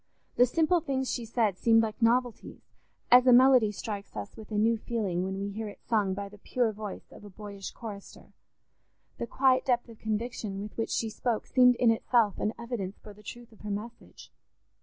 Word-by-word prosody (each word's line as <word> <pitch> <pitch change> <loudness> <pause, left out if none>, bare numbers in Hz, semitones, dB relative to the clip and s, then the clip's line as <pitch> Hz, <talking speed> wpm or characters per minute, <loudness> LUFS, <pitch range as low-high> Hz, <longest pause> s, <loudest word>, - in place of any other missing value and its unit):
The 245 - +5
simple 330 +6 +2
things 265 -3 -2
she 240 - -3
said 220 -4 0
seemed 225 -1 +4
like 220 +1 -4
novelties, 240 +1 0 0.5
as 250 +1 +7
a - - +8
melody 250 -3 +6
strikes 200 0 -6
us 105 -1 -6
with 220 - -12
a 210 - -1
new 225 +2 +3
feeling 210 -6 -2
when 190 +1 -3
we 200 +1 -3
hear 215 +2 -5
it 205 - -10
sung 205 -4 +1
by 200 0 -5
the 205 +1 -15
pure 240 +1 0
voice 210 -1 -8
of - - -14
a 205 - -10
boyish 200 0 -8
chorister; 210 -4 -10 0.9
the 235 - -3
quiet 260 +1 +3
depth 245 -2 0
of 225 - -13
conviction 220 -2 -3
with 210 +1 -7
which 225 - -2
she 225 -1 -1
spoke 235 0 -2
seemed 250 -1 +5
in 235 -1 +4
itself 225 -2 +1
an 210 - 0
evidence 220 -5 -5
for 210 - -13
the 210 - -17
truth 235 +3 -10
of 220 - -19
her 210 - -6
message. 215 +4 -8
225 Hz, 200 wpm, -29 LUFS, 205-240 Hz, 0.9 s, a